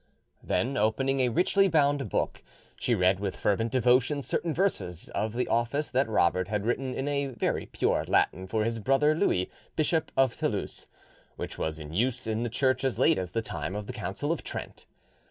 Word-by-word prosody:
Then 135 Hz, +3 st, -1 dB
opening 135 Hz, +6 st, +1 dB
a 125 Hz, -1 st, +3 dB
richly 190 Hz, -, +3 dB
bound 145 Hz, -4 st, +2 dB
book, -, -, -1 dB, 0.3 s
she 120 Hz, -, +1 dB
read 95 Hz, -1 st, +3 dB
with 100 Hz, -1 st, -3 dB
fervent 110 Hz, +3 st, 0 dB
devotion 130 Hz, +3 st, +3 dB
certain 170 Hz, -, -1 dB
verses 100 Hz, -, -1 dB
of 110 Hz, 0 st, -2 dB
the 125 Hz, +1 st, -1 dB
office 120 Hz, +6 st, 0 dB
that 130 Hz, -2 st, +1 dB
Robert 90 Hz, -3 st, +2 dB
had 105 Hz, -1 st, -2 dB
written 130 Hz, +2 st, -1 dB
in 135 Hz, -, -2 dB
a 140 Hz, -1 st, 0 dB
very 130 Hz, -, -2 dB
pure -, -, 0 dB
Latin 95 Hz, +1 st, +1 dB
for 110 Hz, +2 st, 0 dB
his 115 Hz, +1 st, -1 dB
brother 135 Hz, +6 st, +3 dB
Louis, 95 Hz, -, +1 dB, 0.2 s
Bishop 160 Hz, +1 st, +1 dB
of 135 Hz, -3 st, +3 dB
Toulouse, -, -, -3 dB, 0.5 s
which -, -, -6 dB
was 80 Hz, 0 st, -2 dB
in 75 Hz, 0 st, -8 dB
use 125 Hz, +6 st, 0 dB
in 110 Hz, 0 st, -1 dB
the 120 Hz, -, -1 dB
Church 130 Hz, +2 st, +1 dB
as 135 Hz, -2 st, 0 dB
late -, -, +4 dB
as 90 Hz, -1 st, -5 dB
the 115 Hz, -, 0 dB
time 90 Hz, -1 st, -4 dB
of 105 Hz, 0 st, -4 dB
the -, -, -6 dB
Council -, -, -3 dB
of -, -, -2 dB
Trent. -, -, -7 dB
120 Hz, 190 wpm, -28 LUFS, 105-135 Hz, 0.5 s, late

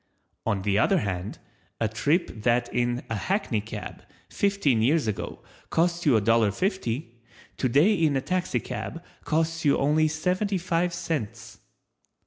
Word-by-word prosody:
On 100 Hz, -2 st, 0 dB
the 100 Hz, 0 st, +2 dB
other 190 Hz, -, +3 dB
hand, 95 Hz, -1 st, -3 dB, 0.4 s
a 110 Hz, -, +2 dB
trip 130 Hz, -, 0 dB
that 120 Hz, +1 st, +1 dB
in 120 Hz, 0 st, 0 dB
a 115 Hz, -, -3 dB
hackney 125 Hz, -, -1 dB
cab, 105 Hz, 0 st, -7 dB, 0.3 s
fifteen 195 Hz, -, +2 dB
years 145 Hz, +5 st, +3 dB
ago, 110 Hz, -3 st, -4 dB, 0.3 s
cost 170 Hz, 0 st, +1 dB
you 135 Hz, -, +6 dB
a 110 Hz, -, +4 dB
dollar 115 Hz, 0 st, +3 dB
fifty, 120 Hz, -, -3 dB, 0.3 s
today 145 Hz, -, +3 dB
in 160 Hz, -7 st, +2 dB
a 135 Hz, -, +1 dB
taxicab 175 Hz, 0 st, -3 dB, 0.2 s
costs 165 Hz, +1 st, 0 dB
you 145 Hz, -2 st, +4 dB
only 150 Hz, +3 st, +3 dB
seventy 180 Hz, +6 st, 0 dB
five 175 Hz, 0 st, 0 dB
cents. 155 Hz, -9 st, -4 dB
145 Hz, 140 wpm, -26 LUFS, 115-170 Hz, 0.4 s, you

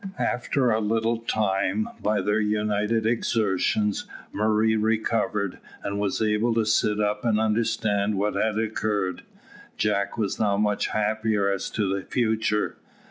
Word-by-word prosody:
After 125 Hz, 0 st, 0 dB
a 110 Hz, -, +2 dB
little 115 Hz, +2 st, 0 dB
time, 110 Hz, -, 0 dB
by 105 Hz, -1 st, +1 dB
their 105 Hz, +3 st, +1 dB
united 105 Hz, +1 st, 0 dB
exertions, 105 Hz, -2 st, +1 dB, 0.3 s
Murray 110 Hz, +1 st, +2 dB
recovered, 110 Hz, -2 st, 0 dB, 0.2 s
and 100 Hz, 0 st, -3 dB
was 100 Hz, +1 st, 0 dB
able 110 Hz, +2 st, +1 dB
to 115 Hz, -1 st, +2 dB
sit 105 Hz, 0 st, +2 dB
up 105 Hz, 0 st, 0 dB
and 110 Hz, -3 st, +2 dB
understand 105 Hz, -2 st, +1 dB
what 105 Hz, +2 st, 0 dB
had 110 Hz, -1 st, 0 dB
occurred. 105 Hz, -3 st, -1 dB, 0.6 s
Jack 100 Hz, -1 st, 0 dB
was 105 Hz, -4 st, -1 dB
now 100 Hz, -2 st, +2 dB
much 105 Hz, -1 st, +1 dB
happier 110 Hz, -1 st, 0 dB
as 100 Hz, -1 st, -2 dB
to 105 Hz, -3 st, -1 dB
the 95 Hz, +1 st, -1 dB
future. 110 Hz, -2 st, 0 dB
105 Hz, 135 wpm, -25 LUFS, 105-110 Hz, 0.6 s, a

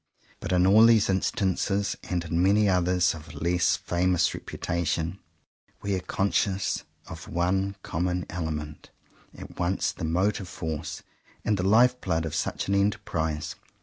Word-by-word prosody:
But -, -, -5 dB
in 90 Hz, 0 st, +4 dB
all 105 Hz, +4 st, +7 dB
these 110 Hz, -4 st, +4 dB
instances, 100 Hz, +1 st, 0 dB
and 85 Hz, -2 st, -1 dB
in 85 Hz, +1 st, 0 dB
many 100 Hz, +3 st, +4 dB
others 90 Hz, -1 st, +2 dB
of 75 Hz, -3 st, -10 dB
a -, -, -11 dB
less 85 Hz, +1 st, +2 dB
famous 90 Hz, 0 st, +1 dB
reputation, 85 Hz, +2 st, -3 dB, 0.6 s
we 100 Hz, -, -1 dB
are 95 Hz, -, 0 dB
conscious 95 Hz, 0 st, 0 dB, 0.2 s
of 80 Hz, 0 st, -9 dB
one 95 Hz, +3 st, 0 dB
common 90 Hz, +2 st, -2 dB
element, 75 Hz, -3 st, -5 dB, 0.5 s
at -, -, -11 dB
once 90 Hz, +2 st, 0 dB
the -, -, -9 dB
motive 95 Hz, +4 st, 0 dB
force 80 Hz, -2 st, -5 dB, 0.4 s
and 105 Hz, -, +2 dB
the 95 Hz, -, -2 dB
life 125 Hz, +4 st, +4 dB
blood 80 Hz, 0 st, -1 dB
of 80 Hz, -, -4 dB
such 80 Hz, -, -2 dB
an 100 Hz, -, 0 dB
enterprise. 80 Hz, -6 st, -1 dB
90 Hz, 150 wpm, -27 LUFS, 80-100 Hz, 0.6 s, all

